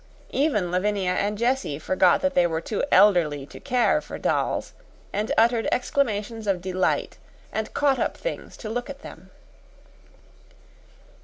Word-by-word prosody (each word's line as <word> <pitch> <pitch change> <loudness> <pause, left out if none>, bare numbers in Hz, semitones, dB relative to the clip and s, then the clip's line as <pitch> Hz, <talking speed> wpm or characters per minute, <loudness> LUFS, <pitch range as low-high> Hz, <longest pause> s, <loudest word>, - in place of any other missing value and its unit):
Even 215 - +1
Lavinia 190 0 0
and 205 +3 -1
Jessie 240 - 0
forgot 185 +3 +3
that 280 0 +1
they 175 -1 +4
were 160 -1 -2
too 200 +5 -3
elderly 165 -9 +4
to - - -12
care 250 -3 +2
for - - -8
dolls, - - -1 0.4
and 210 +2 -1
uttered 230 0 +3
exclamations 225 -4 -1
of 195 -2 +1
delight 185 +1 -1 0.3
and 220 0 -3
caught 275 -3 +2
up - - -1
things - - -6
to 220 - -7
look 245 +4 -3
at 280 0 -9
them. - - -11
210 Hz, 145 wpm, -25 LUFS, 180-245 Hz, 0.4 s, they